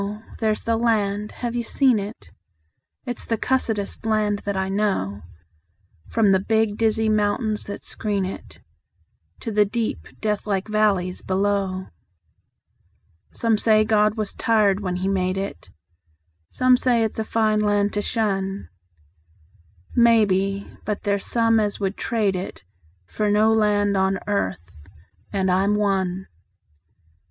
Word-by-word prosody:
There's 215 Hz, -2 st, 0 dB
the 230 Hz, 0 st, +1 dB
land. 210 Hz, -3 st, 0 dB
(Have 240 Hz, -1 st, -4 dB
you 240 Hz, -, 0 dB
seen 250 Hz, -1 st, +2 dB
it?) 205 Hz, +3 st, -8 dB, 0.7 s
It's 245 Hz, -2 st, -5 dB
the 225 Hz, -, -1 dB
cussedest 225 Hz, -5 st, -1 dB
land 215 Hz, -2 st, +1 dB
that 200 Hz, -1 st, -2 dB
I 190 Hz, 0 st, 0 dB
know, 190 Hz, -, -1 dB, 0.9 s
From 220 Hz, -3 st, +3 dB
the 190 Hz, -, +4 dB
big, 220 Hz, +1 st, +1 dB
dizzy 220 Hz, 0 st, +1 dB
mountains 215 Hz, +1 st, 0 dB
that 200 Hz, -, -7 dB
screen 205 Hz, -3 st, -2 dB
it 190 Hz, -, -8 dB, 0.8 s
To 230 Hz, -, -4 dB
the 210 Hz, 0 st, +4 dB
deep, 220 Hz, +2 st, -3 dB
deathlike 210 Hz, -2 st, -1 dB
valleys 205 Hz, -4 st, +1 dB
below. 190 Hz, -1 st, -1 dB, 1.4 s
Some 225 Hz, -2 st, +1 dB
say 215 Hz, -1 st, +4 dB
God 210 Hz, 0 st, +2 dB
was 215 Hz, -2 st, -2 dB
tired 210 Hz, -4 st, +2 dB
when 185 Hz, -3 st, -3 dB
He 185 Hz, +1 st, -2 dB
made 185 Hz, -1 st, 0 dB
it; 195 Hz, -, -5 dB, 0.8 s
Some 255 Hz, 0 st, +4 dB
say 245 Hz, -3 st, +2 dB
it's 220 Hz, 0 st, -2 dB
a -, -, +1 dB
fine 220 Hz, -1 st, +1 dB
land 205 Hz, -1 st, +1 dB
to 205 Hz, -, 0 dB
shun; 195 Hz, -3 st, -2 dB, 1.3 s
Maybe; 200 Hz, -4 st, +3 dB, 0.2 s
but 210 Hz, -1 st, -3 dB
there's 200 Hz, -1 st, -1 dB
some 230 Hz, -1 st, +3 dB
as 205 Hz, -1 st, -1 dB
would 195 Hz, 0 st, -1 dB
trade 210 Hz, -4 st, 0 dB
it 185 Hz, -, -6 dB, 0.4 s
For 210 Hz, -, -1 dB
no 215 Hz, +2 st, +4 dB
land 205 Hz, -2 st, +2 dB
on 190 Hz, 0 st, +2 dB
earth 90 Hz, -, -3 dB, 0.4 s
and 190 Hz, -2 st, +1 dB
I'm 195 Hz, +3 st, +2 dB
one. 190 Hz, -2 st, 0 dB
205 Hz, 135 wpm, -23 LUFS, 195-220 Hz, 1.4 s, the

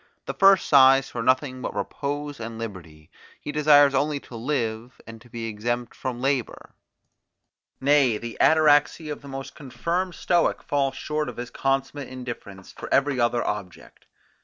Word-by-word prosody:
The -, -, -4 dB
first 195 Hz, -2 st, +5 dB
sighs 135 Hz, -1 st, +5 dB
for 120 Hz, -, -4 dB
nothing 130 Hz, +1 st, 0 dB
but -, -, -5 dB
repose 145 Hz, 0 st, -4 dB
and 115 Hz, 0 st, -6 dB
liberty; 85 Hz, -9 st, -9 dB, 0.3 s
he 150 Hz, -, -6 dB
desires 145 Hz, -1 st, +5 dB
only 145 Hz, +2 st, 0 dB
to 120 Hz, -, -12 dB
live, 115 Hz, -2 st, -3 dB
and 115 Hz, -1 st, -11 dB
to 120 Hz, -, -18 dB
be 115 Hz, -1 st, -6 dB
exempt 120 Hz, +2 st, -3 dB
from 125 Hz, -2 st, -5 dB
labour; 135 Hz, -2 st, -2 dB, 1.1 s
nay, 135 Hz, -5 st, +3 dB
the 115 Hz, +1 st, -7 dB
ataraxy 155 Hz, 0 st, +3 dB
of 145 Hz, -, -6 dB
the 140 Hz, -, -12 dB
most 135 Hz, 0 st, -7 dB
confirmed 170 Hz, +6 st, -3 dB
Stoic 175 Hz, -1 st, +1 dB
falls 135 Hz, -2 st, -1 dB
short 150 Hz, +1 st, -3 dB
of 125 Hz, -, -10 dB
his 120 Hz, 0 st, -6 dB
consummate 135 Hz, 0 st, -2 dB
indifference 120 Hz, -7 st, -9 dB
for -, -, -10 dB
every 140 Hz, -1 st, +2 dB
other 120 Hz, 0 st, +1 dB
object. 100 Hz, -4 st, -7 dB
130 Hz, 160 wpm, -24 LUFS, 115-145 Hz, 1.1 s, first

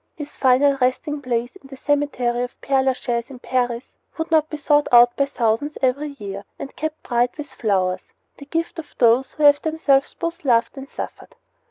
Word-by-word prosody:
His 295 Hz, -1 st, -8 dB
final 275 Hz, +2 st, +3 dB
resting 285 Hz, +4 st, 0 dB
place, 245 Hz, 0 st, -2 dB
in 325 Hz, -, -17 dB
the 270 Hz, -1 st, -11 dB
cemetery 260 Hz, -4 st, 0 dB
of 245 Hz, -1 st, -5 dB
Pere 270 Hz, -1 st, +1 dB
Lachaise, 250 Hz, -2 st, -1 dB
in 270 Hz, -, -10 dB
Paris, 245 Hz, -1 st, -1 dB, 0.3 s
would 320 Hz, 0 st, -4 dB
not 315 Hz, -1 st, +3 dB
be 305 Hz, -, -5 dB
sought 295 Hz, 0 st, +2 dB
out 240 Hz, 0 st, +7 dB
by 280 Hz, -, +1 dB
thousands 245 Hz, +3 st, -1 dB
every 280 Hz, +3 st, -1 dB
year 200 Hz, -2 st, -7 dB
and 275 Hz, -, -8 dB
kept 315 Hz, 0 st, -5 dB
bright 245 Hz, 0 st, 0 dB
with 290 Hz, -3 st, -8 dB
flowers, 185 Hz, -6 st, -1 dB, 0.3 s
the 280 Hz, -, -10 dB
gift 330 Hz, +2 st, -3 dB
of 310 Hz, -, -10 dB
those 245 Hz, +2 st, +3 dB
who 305 Hz, -, -4 dB
have 290 Hz, 0 st, +6 dB
themselves 305 Hz, -4 st, +1 dB
both 335 Hz, +1 st, -4 dB
loved 235 Hz, -3 st, +2 dB
and 270 Hz, 0 st, -9 dB
suffered. -, -, -8 dB
270 Hz, 190 wpm, -21 LUFS, 240-295 Hz, 0.3 s, out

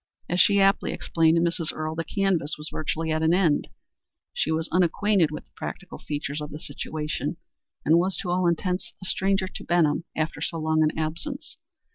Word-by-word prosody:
As 175 Hz, -, 0 dB
she 200 Hz, +2 st, +5 dB
aptly 195 Hz, 0 st, +3 dB
explained 165 Hz, -1 st, +2 dB
to 165 Hz, -, +3 dB
Mrs. 170 Hz, -2 st, 0 dB
Earle, 155 Hz, 0 st, -3 dB
the 165 Hz, +1 st, -2 dB
canvass 185 Hz, -6 st, 0 dB
was 150 Hz, +1 st, -4 dB
virtually 160 Hz, +1 st, -2 dB
at 155 Hz, 0 st, 0 dB
an 160 Hz, +2 st, +4 dB
end, 170 Hz, -6 st, +2 dB, 0.7 s
she -, -, 0 dB
was 160 Hz, 0 st, 0 dB
unacquainted 180 Hz, 0 st, +3 dB
with 150 Hz, -, -7 dB
the -, -, -39 dB
practical 190 Hz, -2 st, -7 dB
features 145 Hz, 0 st, -4 dB
of 150 Hz, -, -5 dB
the 150 Hz, -, -7 dB
situation, 150 Hz, +2 st, -4 dB, 0.5 s
and 160 Hz, +3 st, +6 dB
was 185 Hz, +2 st, +1 dB
to 180 Hz, -, -3 dB
all 180 Hz, 0 st, +2 dB
intents 180 Hz, +2 st, -1 dB
a 185 Hz, -, -8 dB
stranger 195 Hz, +1 st, +1 dB
in -, -, -10 dB
Benham 170 Hz, -2 st, +2 dB
after 155 Hz, +1 st, -2 dB
so 165 Hz, -, -2 dB
long 160 Hz, 0 st, +1 dB
an 155 Hz, 0 st, +2 dB
absence. 165 Hz, -, -4 dB
165 Hz, 190 wpm, -26 LUFS, 155-185 Hz, 0.7 s, and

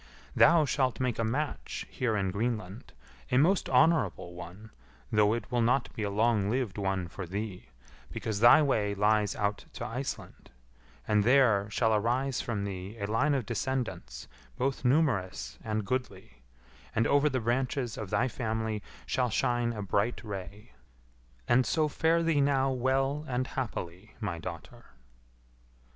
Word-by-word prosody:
Thou 165 Hz, -1 st, +6 dB
shalt 130 Hz, -3 st, 0 dB
make 125 Hz, -3 st, -1 dB
a -, -, +2 dB
match 140 Hz, +7 st, -3 dB
here 120 Hz, -5 st, 0 dB
in 95 Hz, -2 st, 0 dB
Greenland, 105 Hz, -1 st, -3 dB, 0.4 s
a 125 Hz, -, +3 dB
most 175 Hz, +8 st, +3 dB
honourable 125 Hz, -, +2 dB
one, 90 Hz, +5 st, -10 dB, 0.4 s
though 105 Hz, 0 st, +4 dB
it 120 Hz, -, -6 dB
will 120 Hz, -1 st, +1 dB
not 120 Hz, +3 st, +1 dB
be -, -, -5 dB
a 105 Hz, -, -1 dB
long 105 Hz, -1 st, +2 dB
lived 120 Hz, -4 st, -1 dB
one 95 Hz, -3 st, -1 dB
for 90 Hz, +1 st, -7 dB
thee, 100 Hz, +1 st, -5 dB, 0.4 s
because 110 Hz, -3 st, -3 dB
thy 120 Hz, +7 st, +7 dB
way 105 Hz, -7 st, +1 dB
lies 105 Hz, 0 st, +2 dB
out 105 Hz, 0 st, -2 dB
to 115 Hz, -, -5 dB
Iceland; 125 Hz, +3 st, -6 dB, 0.6 s
and 105 Hz, -1 st, +3 dB
there, 115 Hz, -5 st, +4 dB
shall 110 Hz, +1 st, +1 dB
arise 125 Hz, +5 st, 0 dB
from 105 Hz, -4 st, -3 dB
thee 100 Hz, +2 st, -6 dB
a 100 Hz, -, -3 dB
line 130 Hz, +8 st, +1 dB
of 130 Hz, -5 st, -1 dB
descendants 115 Hz, -, -3 dB, 0.3 s
both 135 Hz, 0 st, -1 dB
numerous 120 Hz, -, 0 dB
and 110 Hz, -1 st, -2 dB
goodly, 100 Hz, -, -4 dB, 0.5 s
and 110 Hz, -, +2 dB
over 145 Hz, +3 st, +3 dB
the 130 Hz, -2 st, -1 dB
branches 120 Hz, +1 st, -1 dB
of 105 Hz, -3 st, -6 dB
thy 125 Hz, -, +1 dB
family 110 Hz, -3 st, -2 dB, 0.2 s
shall 125 Hz, -1 st, 0 dB
shine 120 Hz, +1 st, +1 dB
a 105 Hz, -3 st, -5 dB
bright 100 Hz, +6 st, 0 dB
ray. 100 Hz, -, -8 dB, 0.8 s
And 130 Hz, +2 st, +4 dB
so 155 Hz, +7 st, +1 dB
fare 165 Hz, +3 st, +2 dB
thee 160 Hz, -3 st, +2 dB
now 135 Hz, -1 st, +2 dB
well 135 Hz, +3 st, 0 dB
and 130 Hz, -1 st, -1 dB
happily, 105 Hz, -7 st, -5 dB
my 100 Hz, -7 st, -3 dB
daughter." 80 Hz, -2 st, -8 dB
115 Hz, 155 wpm, -29 LUFS, 100-130 Hz, 0.8 s, thy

